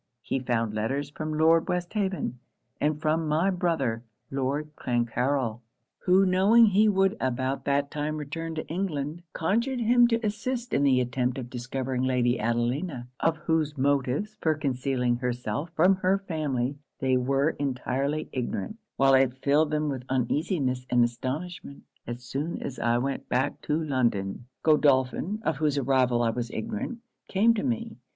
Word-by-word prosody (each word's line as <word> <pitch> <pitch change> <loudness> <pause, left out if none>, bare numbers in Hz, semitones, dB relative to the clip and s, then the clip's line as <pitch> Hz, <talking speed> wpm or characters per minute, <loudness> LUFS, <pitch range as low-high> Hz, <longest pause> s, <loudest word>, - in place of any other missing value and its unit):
He 135 - -1
found 115 -4 -1
letters 135 +7 -2
from 155 0 -4
Lord 165 +1 +4
Westhaven, 180 - -2 0.4
and 150 0 0
from 155 +1 0
my 160 +6 +2
brother, 160 -11 0 0.3
Lord 140 +3 -2
Clancarryl; 120 0 -1 0.5
who 190 +2 +6
knowing 195 +6 +6
he 210 +1 +4
would 195 0 +2
about 130 +1 -1
that 140 0 +1
time 150 +1 -2
return 160 +2 -5
to 155 - -4
England, 160 -3 -3
conjured 235 +10 0
him 240 +1 +5
to 230 -1 0
assist 240 +4 -3
in 140 - +3
the 135 -2 +4
attempt 125 +1 -1
of 125 -2 -6
discovering 125 +1 -3
Lady 125 -1 +1
Adelina; 120 +4 -1
of 165 0 +1
whose 155 -2 +1
motives 140 +9 0
for 160 -1 +2
concealing 130 -4 0
herself 125 +4 -3
from 185 +4 +4
her 190 +1 +2
family 145 -8 -2 0.2
they 130 -2 +2
were 135 +4 +2
entirely 140 +2 -1
ignorant, 140 - -3 0.2
while 135 0 +4
it 130 -1 +4
filled 145 +2 +3
them 150 0 0
with 135 -3 -2
uneasiness 130 +1 0
and 120 -1 +4
astonishment. 140 +6 -4 0.2
As 120 +1 -6
soon 140 +7 -3
as 135 - -5
I 120 0 +2
went 135 +3 -3
back 135 +3 0
to 150 +1 +1
London, 120 -8 -1 0.2
Godolphin, 150 +7 +2
of 160 -7 0
whose 150 -1 +1
arrival 130 -3 +2
I 115 - +2
was 120 0 -3
ignorant, 110 - -4 0.3
came 220 +4 +4
to 215 - -2
me. 230 -3 -2
140 Hz, 155 wpm, -27 LUFS, 125-165 Hz, 0.5 s, who